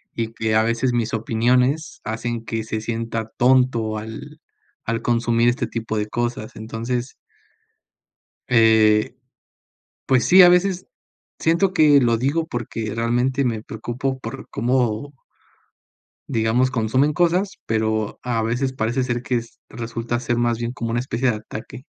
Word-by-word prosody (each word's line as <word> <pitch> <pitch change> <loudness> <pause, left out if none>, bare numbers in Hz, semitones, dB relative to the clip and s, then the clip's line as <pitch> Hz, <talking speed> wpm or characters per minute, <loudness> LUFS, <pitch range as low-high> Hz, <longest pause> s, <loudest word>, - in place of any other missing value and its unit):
y 115 -1 -2
que 110 -1 -1
a 110 - +4
veces 120 +2 0
mis 115 -2 -1
opiniones 125 +7 +1
hacen 115 +1 -3
que 115 -1 -3
se 110 0 -3
sienta 115 0 -3
tonto 120 -4 +3
al 110 +1 -8 0.5
al 115 0 -1
consumir 120 0 +2
este 120 - -1
tipo 110 -1 -4
de 105 0 -1
cosas, 120 -1 -3
entonces 115 +3 -4 1.3
eh, 110 -1 +4 0.9
pues 130 -2 +3
sí, 185 +1 +8
a 175 - +9
veces, 180 +1 +2 0.5
siento 170 +4 +2
que 150 -4 +6
lo 120 -2 +3
digo 145 +7 0
porque 115 -4 -4
realmente, 125 +4 0
me 115 -3 -1
preocupo 125 +5 -4
por 135 0 -8
cómo 125 +3 0 1.2
digamos 115 +3 +1
consumen 130 +5 +1
cosas, 175 +4 +1
pero, 110 -1 -1
a 115 -2 -1
veces 125 +4 -1
parece 120 +1 -1
ser 120 -1 -2
que 125 - -2
es 115 0 -6
resulta 115 0 -4
ser 120 -1 -1
más 120 -1 +1
bien 120 0 -3
como 115 -2 -4
una 120 +1 0
especie 125 0 0
de 110 - -2
ataque. 110 +4 -9
120 Hz, 145 wpm, -22 LUFS, 110-130 Hz, 1.3 s, a